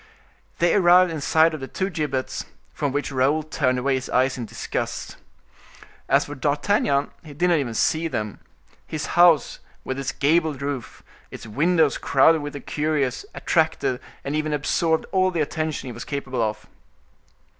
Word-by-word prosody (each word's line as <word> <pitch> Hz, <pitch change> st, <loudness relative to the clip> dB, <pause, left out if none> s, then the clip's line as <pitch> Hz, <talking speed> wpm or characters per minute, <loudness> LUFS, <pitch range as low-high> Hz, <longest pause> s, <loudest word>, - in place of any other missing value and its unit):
They 175 Hz, 0 st, +3 dB
arrived 180 Hz, -2 st, +5 dB
in 155 Hz, -2 st, -4 dB
sight 160 Hz, +2 st, +3 dB
of 155 Hz, -, -4 dB
the 135 Hz, -, -6 dB
two 190 Hz, +6 st, -3 dB
gibbets, 145 Hz, -5 st, -3 dB, 0.3 s
from 145 Hz, -2 st, -2 dB
which 145 Hz, +1 st, -2 dB
Raoul 140 Hz, +4 st, +2 dB
turned 135 Hz, -4 st, 0 dB
away 135 Hz, +2 st, +1 dB
his 130 Hz, 0 st, -3 dB
eyes 130 Hz, +1 st, +2 dB
in 120 Hz, -3 st, -5 dB
disgust. -, -, -4 dB, 0.9 s
As 140 Hz, +1 st, +4 dB
for 145 Hz, -, -7 dB
D'Artagnan, 145 Hz, +1 st, +1 dB
he 150 Hz, -3 st, -11 dB
did 180 Hz, +4 st, +1 dB
not 170 Hz, -3 st, +3 dB
even 120 Hz, -5 st, -3 dB
see 160 Hz, +8 st, +1 dB
them; 105 Hz, -9 st, -4 dB, 0.5 s
his 155 Hz, -1 st, -4 dB
house 170 Hz, -4 st, +4 dB, 0.2 s
with 130 Hz, +1 st, -4 dB
its 135 Hz, -, -2 dB
gabled 155 Hz, -1 st, +1 dB
roof, 140 Hz, -3 st, -5 dB, 0.3 s
its -, -, -10 dB
windows 155 Hz, +6 st, +2 dB
crowded 155 Hz, +4 st, +4 dB
with 145 Hz, 0 st, -6 dB
the 145 Hz, -, -6 dB
curious, 150 Hz, -, -1 dB
attracted 155 Hz, -6 st, 0 dB, 0.2 s
and 140 Hz, +2 st, -3 dB
even 155 Hz, 0 st, -1 dB
absorbed 160 Hz, +2 st, +1 dB
all 185 Hz, -1 st, +3 dB
the 170 Hz, -3 st, -1 dB
attention 155 Hz, 0 st, -2 dB
he 125 Hz, -, -6 dB
was 120 Hz, -, -7 dB
capable 135 Hz, -3 st, -3 dB
of. 110 Hz, -1 st, -2 dB
145 Hz, 165 wpm, -23 LUFS, 135-160 Hz, 0.9 s, arrived